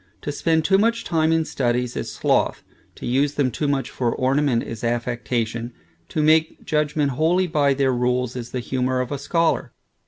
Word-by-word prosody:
To 145 - -2
spend 160 +1 +1
too 195 +2 +4
much 230 +2 +1
time 160 -1 +1
in 165 -1 +2
studies 125 -3 -1
is - - -4
sloth; - - 0 0.3
to - - -8
use 140 +4 +1
them 135 -3 +1
too 145 +6 -2
much 135 -2 -1
for 120 -3 -1
ornament, 130 -1 +1
is 115 -1 -7
affectation; 120 0 -2 0.4
to 155 - 0
make 160 +1 +2
judgment 150 -1 0
wholly 165 +7 +2
by 145 -5 +2
their 135 -1 +2
rules, 125 0 0
is 120 -1 -5
the 125 - -3
humor 130 +1 -1
of 125 +1 -2
a 145 - -3
scholar. 165 +3 0
135 Hz, 185 wpm, -22 LUFS, 125-155 Hz, 0.4 s, too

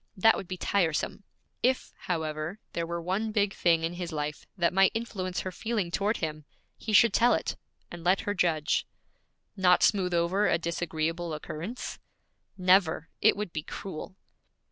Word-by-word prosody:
That 225 +4 +6
would 195 - -6
be 185 - -5
tiresome. 180 +1 0 0.4
If, 255 +1 +1
however, 160 +1 -3 0.2
there 170 -1 -2
were 170 0 -3
one 190 +6 -1
big 205 -2 +1
thing 165 -2 +2
in 165 +1 -1
his 175 -1 -5
life 150 -1 -4
that 175 0 +2
might 195 0 +6
influence 190 -5 -3
her 185 - -4
feeling 210 -2 -2
toward 205 +5 +1
him, 155 -2 -4 0.3
he 220 - -5
should 215 0 +6
tell 240 +1 +5
it, - - -2 0.4
and 175 -1 -8
let 185 +3 +3
her 205 - -1
judge.' 165 -5 +1 0.7
'Not 180 -2 +4
smooth 185 -4 +3
over 180 +5 +2
a - - +3
disagreeable 170 -1 -2
occurrence?' 165 +10 -6 0.6
'Never! 180 -4 +3
It - - +5
would 210 -4 -4
be 155 - -2
cruel.' 185 +3 -7
180 Hz, 165 wpm, -28 LUFS, 165-200 Hz, 0.7 s, That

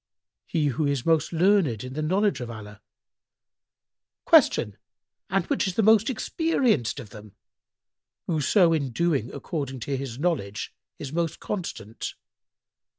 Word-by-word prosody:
"— - - -66
"He 155 -2 0
who 145 +3 0
is 140 -3 -1
most 160 -2 +2
learned 170 - +2
in 130 0 -7
the 155 - -3
knowledge 185 - +1
of 120 - -5
Allah." 105 -2 -10 1.5
Q 105 - +5 0.6
"And 195 -3 +1
which - - 0
is 185 - -3
the 225 - +2
most 220 +1 +5
experienced 245 - 0
of 110 -6 -10
them?"—"Whoso 155 - -2
in 140 -4 0
doing 135 -2 0
according 140 -6 -5
to 140 +4 -2
his 130 -3 -5
knowledge 130 - -2 0.2
is 145 -1 -7
most 170 -1 -1
constant." 115 - -5
150 Hz, 135 wpm, -26 LUFS, 120-180 Hz, 1.5 s, Q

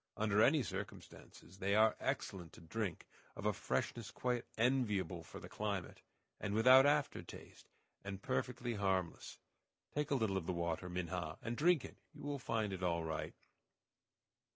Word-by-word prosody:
Under 105 -1 +3
any 145 +3 +5
circumstances, 95 0 -8
they 100 +2 +2
are 110 +1 +5
excellent 90 -4 -3
to - - -13
drink, 90 +2 -3 0.3
of - - -7
a - - +3
freshness - - -2
quite 125 -1 -1
enviable 105 -8 +1
for - - -10
the - - -9
climate, 100 -4 -3 0.4
and 100 - -2
without 130 +5 +8
after 145 0 +2
taste, - - -12 0.4
and 100 -1 -5
perfectly 125 -1 -1
harmless. 95 -4 -1 0.6
Take 150 0 -1
a 140 - +2
little 110 -6 +1
of 85 - -3
the 90 - 0
water, 85 +1 -2
Minha, 90 -2 -3
and 115 +1 -2
drink 165 +2 +4
it; - - -11 0.2
you 145 - -10
will 145 -1 -2
find 110 -5 -1
it 95 - -5
all 85 -2 +1
right." 80 -1 -3
105 Hz, 160 wpm, -37 LUFS, 90-125 Hz, 0.6 s, without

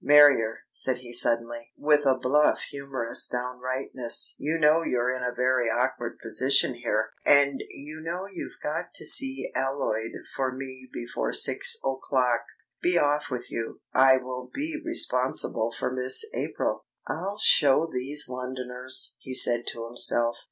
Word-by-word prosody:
"Marrier," 145 -6 +5
said 130 -1 +1
he 120 -1 -11
suddenly, 115 0 +1
with 150 -1 +2
a 130 -1 +3
bluff 140 +4 +2
humorous 135 -4 -2
downrightness, 125 0 -3
"you 155 +3 -1
know 155 +1 +4
you're 125 -5 -1
in 130 - -6
a 125 0 -2
very 125 -1 +1
awkward 120 0 -2
position 130 0 +3
here, 115 -2 -2
and 140 -1 +4
you 155 +3 -10
know 170 +4 -5
you've 195 -3 -9
got 160 +4 -4
to - - -5
see 135 0 +3
Alloyd 130 -4 -2 0.2
for 130 -1 -1
me 130 0 -9
before 120 0 -4
six - - +4
o'clock. 130 -2 0 0.4
Be 175 0 +2
off 145 -1 +1
with 125 -2 -6
you. 115 -1 -5
I 130 0 +6
will 125 0 -7
be 310 +2 -4
responsible 125 - +2
for 115 - -4
Miss 130 - +3
April." - - -3 0.2
("I'll 195 +5 -4
show 145 -3 +5
these 140 +4 -1
Londoners!" 125 0 -3
he 130 0 -7
said 120 -1 +4
to 115 - -5
himself. 120 0 0
130 Hz, 145 wpm, -26 LUFS, 125-145 Hz, 0.4 s, I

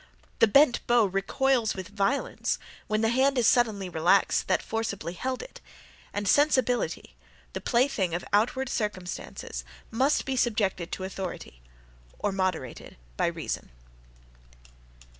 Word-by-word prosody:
The - - +6
bent 255 +3 +5
bow 240 -2 +5
recoils 225 +5 +1
with 190 +1 -6
violence, 205 +7 -1 0.3
when 215 0 0
the 225 - +2
hand 265 +3 +2
is 240 - +3
suddenly 220 -5 +3
relaxed 175 +3 +2
that - - +1
forcibly 200 -7 -3
held 255 +7 -3
it: - - -12 0.5
and 205 0 -3
sensibility, 250 - +2 0.4
the - - -4
plaything 235 -9 +1
of 175 - -4
outward 245 +6 +2
circumstances, 210 -6 -4 0.3
must 265 +6 +2
be 270 - -1
subjected 205 -8 0
to 185 - -4
authority, 190 - -6 0.6
or 205 - -1
moderated 185 -10 -3 0.2
by - - +1
reason. - - -4
215 Hz, 125 wpm, -27 LUFS, 190-250 Hz, 0.6 s, The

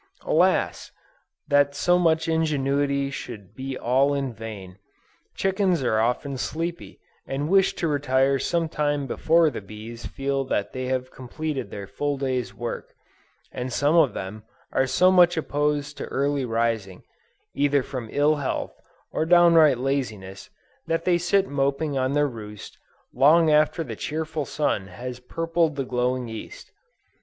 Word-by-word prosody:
Alas! - - +1 0.6
that 145 -1 +3
so 175 +4 +3
much 165 -1 +2
ingenuity 140 -3 0
should 105 -7 -8
be 135 0 -5
all 135 +4 +2
in 135 -3 -2
vain! 100 -4 -9 0.6
Chickens 190 -5 +1
are 110 -3 +2
often 125 +4 -1
sleepy, 170 +4 -4 0.3
and 145 +3 -2
wish 195 0 +4
to 165 - -1
retire 135 -2 +2
sometime 150 -4 0
before 160 +4 +3
the 115 - -6
bees 110 +3 -9
feel 135 0 -2
that 105 -6 -2
they 130 0 -4
have 130 0 -2
completed 135 +1 -5
their 100 -1 -7
full 145 +7 -2
day's 130 -3 -2
work, 120 0 -6 0.6
and 125 +1 -5
some 145 +5 +2
of 160 -6 +4
them 100 +3 -6 0.3
are 135 - +1
so 185 +7 +4
much 175 -2 +5
opposed 150 -1 -1
to - - -3
early 140 0 -1
rising, 115 -5 -1 0.5
either 140 -1 +2
from 125 -4 -6
ill 150 +1 +3
health, 140 -2 -3 0.4
or - - 0
downright 165 -4 +6
laziness, 110 -8 -3 0.4
that 165 0 -1
they 175 -1 +3
sit 195 +3 +2
moping 140 +1 -1
on 130 0 0
their 145 0 +3
roost, 105 -5 -9 0.4
long 155 +5 +5
after 155 +2 +3
the 115 -7 -6
cheerful 155 +3 -3
sun 140 -9 -1
has 125 +6 -7
purpled 165 +4 -1
the 135 -2 -2
glowing 125 0 -1
East. 110 -1 -9
140 Hz, 145 wpm, -24 LUFS, 125-155 Hz, 0.6 s, downright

